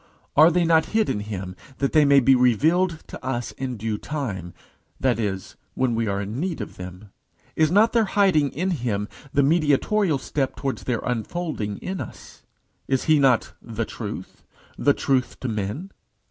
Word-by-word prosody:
Are 155 +3 +8
they 175 0 +2
not 160 -1 +4
hid 220 - +2
in - - -2
him 95 -3 -5 0.2
that 140 - -1
they 155 -1 +6
may 140 0 +6
be 135 +1 +5
revealed 155 - +2
to - - -10
us 120 -2 -2
in 130 -2 -5
due 105 0 -3
time 105 - -4 0.5
that 130 -3 +1
is, 95 -4 -3 0.2
when 130 -2 +1
we 115 -1 0
are 100 -1 -1
in 105 +5 -4
need 175 0 -2
of - - -7
them? 90 +2 -9 0.4
Is 155 -1 +3
not 210 +6 +4
their 230 -2 +4
hiding 190 -8 +3
in 180 +7 -1
him 115 - -1 0.2
the 140 - +3
mediatorial 155 +4 +2
step 135 0 -2
towards 135 -1 -4
their 120 -3 -1
unfolding 120 - -3
in 190 0 -3
us? - - -10 0.5
Is 130 -1 +1
he 155 -2 +4
not 130 -4 +3
the 115 -1 -4
Truth? 105 -5 -7 0.3
the 145 - +3
Truth 130 -3 0
to 130 - -2
men? 110 - -3
130 Hz, 175 wpm, -24 LUFS, 110-160 Hz, 0.5 s, Are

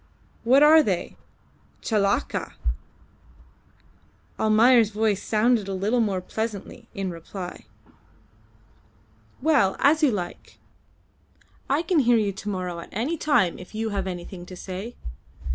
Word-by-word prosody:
What 260 +5 +5
are 315 +1 +8
they? 190 - -2 0.7
Chelakka!" 200 -3 0 1.9
Almayer's 225 +1 +5
voice 210 -2 0
sounded 220 -1 +1
a 195 - -3
little 210 +6 0
more 200 -5 0
pleasantly 220 +3 -5
in 195 -2 -3
reply. 175 +2 -8 1.8
"Well, 270 -12 +3
as 300 +3 +3
you 300 - +5
like. 180 -6 -5 1.1
I 285 +5 +1
can 350 -3 +2
hear 240 -3 +4
you 210 -2 +1
to 195 +2 -7
morrow 180 -3 -4
at 170 - -10
any 250 - -2
time 290 - +1
if 180 +4 -12
you 220 +1 -2
have 195 -2 -3
anything 175 0 -7
to 185 - -9
say. 190 +6 -7
215 Hz, 125 wpm, -24 LUFS, 190-245 Hz, 1.9 s, are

